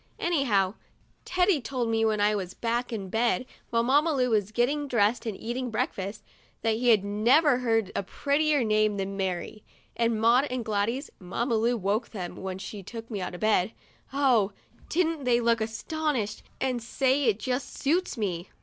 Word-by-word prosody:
Anyhow, 230 - +1 0.5
Teddy 365 -4 +2
told 245 0 -2
me, 225 0 +1
when 215 -1 +2
I 205 +1 +3
was 185 -3 -4
back 240 +2 -1
in 200 -4 -4
bed, 235 +4 +1 0.2
while 230 0 +2
Mamma 290 +6 +3
Lu 250 -3 +1
was 210 -2 +1
getting 280 +6 +1
dressed 230 -1 +1
and 210 -3 -3
eating 245 +2 -3
breakfast, 205 -2 -3 0.4
that 225 -1 +2
he 245 +2 -1
has 220 -4 +6
never 245 +7 +4
heard 225 -5 +1
a - - +1
prettier 285 +6 +1
name 215 -1 +2
than 195 0 -3
Mary; 190 +2 -3 0.3
and 230 -2 +1
Maud 235 +5 +4
and 250 -4 -4
Gladys 220 +6 -1
(Mamma 230 +7 -2
Lu 230 +2 +2
woke 210 +3 -1
them 185 -5 -6
when 190 -1 -5
she 200 +1 -7
took 230 +4 -9
me 205 -3 -3
out 180 - -4
of - - -10
bed) 215 -1 +2 0.4
oh! 250 -8 +3 0.4
didn't 330 -3 0
they 245 -2 +3
look 230 -1 +2
astonished 225 0 -2 0.2
and 255 -2 -1
say 265 +4 +1
it 220 -4 +3
just 250 +2 -3
suits 325 +1 0
me. 185 -5 -3
230 Hz, 175 wpm, -27 LUFS, 210-260 Hz, 0.5 s, has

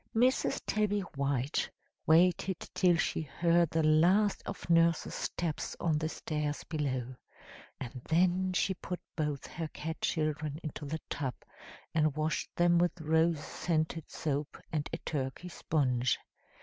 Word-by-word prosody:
"Mrs. 250 +3 +2
Tabby 210 -1 +1
White 140 -5 -1 0.4
waited 175 +2 +4
till 180 -2 +4
she - - 0
heard 170 +2 +2
the 160 0 +1
last 180 +7 +4
of - - -6
Nurse's 165 -1 +3
steps 165 -4 -3
on 155 -3 +1
the 155 +1 -1
stairs 150 -2 -3
below, 130 -5 -2 0.6
and 130 -1 -6
then 180 +3 +3
she 190 +1 +2
put 180 -1 -5 0.2
both 150 -3 -2
her 165 -1 -4
cat 160 +1 -6
children 155 -2 -1
into 150 -1 -5
the 160 +2 -3
tub, 135 -4 -2 0.6
and 155 -3 +2
washed 155 +1 -1
them 175 0 +4
with 175 0 +1
rose 160 0 +2
scented 160 -1 -1
soap 145 -1 -2
and 155 -3 -1
a - - -2
Turkey 140 +4 -4
sponge. 125 -7 +1
160 Hz, 135 wpm, -32 LUFS, 150-175 Hz, 0.6 s, waited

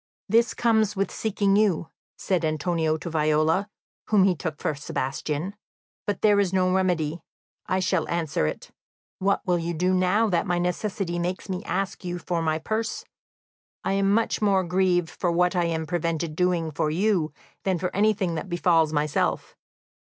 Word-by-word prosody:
"This 230 +2 +3
comes 220 -3 +2
with 195 0 -1
seeking 200 -2 +1
you," 195 -6 +2 0.3
said 180 -3 0
Antonio 160 +1 0
to 165 - -8
Viola, 155 +4 +1 0.4
whom 210 -3 +4
he 190 -1 +4
took 155 0 -5
for - - -1
Sebastian; 145 +5 -3 0.5
"but 205 -2 -2
there 205 -1 +5
is 195 -3 +2
no 185 -1 +2
remedy, 170 -4 0 0.5
I 185 0 +1
shall 185 - 0
answer 160 - 0
it. - - -6 0.5
What 200 +1 +1
will 180 -1 +2
you 170 +1 -3
do 180 +3 +1
now 185 +5 +3
that 180 +2 +1
my 175 -1 +1
necessity 180 0 -2
makes 180 +3 -3
me 185 +1 -3
ask 195 -1 -2
you 175 -1 -3
for 175 0 -2
my 160 -1 +1
purse? 215 +8 -3 0.8
I - - 0
am 195 0 +2
much 225 +2 +1
more 195 -3 +3
grieved 180 -1 +1
for 175 - -1
what 180 +1 +2
I 175 -1 +2
am 160 -1 -1
prevented 165 -1 -2
doing 175 -2 +1
for 150 +1 0
you 175 -1 +1 0.3
than 190 -2 +1
for 180 +1 -3
anything 200 -3 +2
that 160 +3 -4
befalls 170 -3 +3
myself. 150 -1 -1
180 Hz, 170 wpm, -25 LUFS, 160-195 Hz, 0.8 s, there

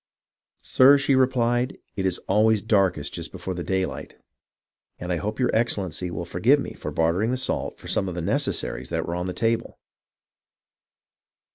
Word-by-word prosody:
"Sir," 135 +2 +6
she 140 0 +1
replied, 125 -1 +1 0.2
"it 95 -1 0
is 90 - -1
always 110 +1 +3
darkest 100 -9 +1
just - - -5
before 95 - -5
day 95 +1 -1
light, - - -8 0.8
and 90 +1 -3
I - - 0
hope 105 +8 -4
your 125 - +1
Excellency 95 -6 0
will 85 0 -5
forgive 115 +12 +3
me - - -5
for - - -6
barter 85 +3 +1
ing 110 - +1
the 130 - 0
salt 130 - -3
for - - -12
some 95 - 0
of 90 - -6
the 90 - -3
necessaries 65 -5 -1
that - - -2
were 85 - -4
on 90 +1 -3
the 90 - -3
table." 115 +2 -1
100 Hz, 175 wpm, -24 LUFS, 90-120 Hz, 0.8 s, Sir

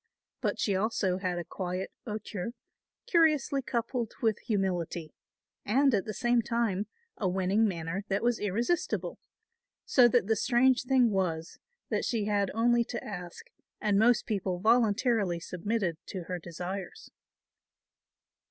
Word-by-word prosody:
But - - -1
she 200 - +1
also 190 -2 0
had 180 -2 -2
a 175 - -2
quiet 185 0 -4 0.2
hauteur, 210 -1 -4 0.5
curiously 305 -5 +3
coupled 240 -2 -2
with 220 -2 +1
humility, 180 -6 -2 0.5
and 270 +5 +3
at 200 -3 +1
the 215 - -4
same 240 0 +2
time 225 -4 -1 0.3
a 190 - 0
winning 190 +4 +2
manner 170 +1 -3
that 195 +2 -1
was 240 -1 +2
irresistible; 230 - -1 0.7
so 250 -3 +6
that 240 -3 +3
the 220 +2 +2
strange 250 +3 +3
thing 250 -3 +4
was 170 -4 -2 0.3
that - - 0
she 225 -4 0
had 205 -2 +1
only 235 +1 +3
to 235 - -5
ask 180 -4 -8 0.3
and 205 -2 +2
most 235 +1 +4
people 195 -4 -1
voluntarily 220 -3 +2
submitted 180 0 -2
to 185 -3 -5
her 180 +1 -4
desires. 185 - -6
210 Hz, 135 wpm, -30 LUFS, 185-235 Hz, 0.7 s, so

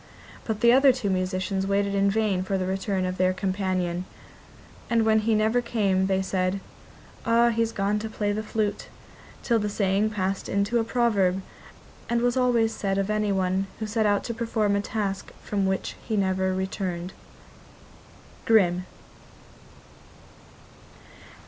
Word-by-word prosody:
But 220 -2 -3
the 235 0 +6
other 270 +1 +6
two 245 -6 -2
musicians 185 +1 -1
waited 200 0 +1
in 200 0 +3
vain 205 -3 +1
for 190 +1 -1
the 185 - -1
return 190 0 -1
of 185 0 -3
their 185 0 +3
companion; 185 -2 -2 0.8
and 230 -1 +2
when 220 0 +4
he 220 +1 +1
never 220 +3 +2
came 195 -5 +1
they 190 0 +1
said: 185 0 -1 0.6
'Ah, 235 +1 +4
he's 230 -1 0
gone 205 0 0
to 220 +1 -5
play 205 -1 -1
the 210 +1 -2
flute,' 215 -1 -2 0.6
till 235 -2 +2
the 210 0 -1
saying 200 +1 +1
passed 195 -2 -2
into 200 +4 +1
a - - +1
proverb, 200 -6 +1 0.7
and 235 0 +1
was 245 0 +2
always 240 -3 +2
said 195 -1 -2
of 195 +1 0
anyone 195 -2 0
who 220 - -4
set 215 0 +1
out 205 -1 +2
to 235 - -4
perform 220 -3 0
a 200 - +1
task 200 -2 -3
from 200 -2 -1
which 190 0 -2
he 220 - -2
never 190 -1 +1
returned. 185 -1 -3 1.3
Grimm. 185 -5 +3
200 Hz, 150 wpm, -25 LUFS, 190-220 Hz, 1.3 s, the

